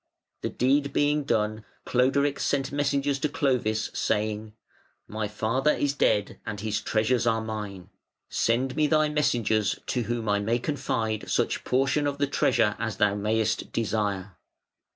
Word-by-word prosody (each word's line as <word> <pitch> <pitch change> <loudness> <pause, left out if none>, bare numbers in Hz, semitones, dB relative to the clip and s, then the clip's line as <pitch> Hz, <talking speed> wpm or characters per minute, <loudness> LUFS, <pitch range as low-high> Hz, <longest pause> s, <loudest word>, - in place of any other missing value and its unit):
The - - -2
deed 140 +2 +1
being 145 0 +2
done, 110 -2 0 0.2
Cloderic 140 +3 +2
sent 135 -2 0
messengers 140 -1 0
to 150 - 0
Clovis 120 -7 0
saying: 105 0 -1 0.5
"My 110 0 -3
father 115 +7 +1
is 145 -1 0
dead 105 -7 +1
and 105 -1 -5
his 110 +1 -2
treasures 115 +3 +1
are 110 -1 +2
mine. 105 -4 -6 0.4
Send 125 +3 0
me 155 -1 +3
thy 155 0 +3
messengers 110 -8 +1
to 125 - -1
whom 120 -1 -3
I 105 0 +2
may 110 +4 +1
confide 120 -5 -2
such - - 0
portion 135 +3 +1
of 140 0 -2
the 145 - +2
treasure 110 -6 +2
as 115 -4 -3
thou 105 -1 +3
mayest 110 +2 -1
desire". 105 -4 -2
115 Hz, 150 wpm, -27 LUFS, 110-140 Hz, 0.5 s, me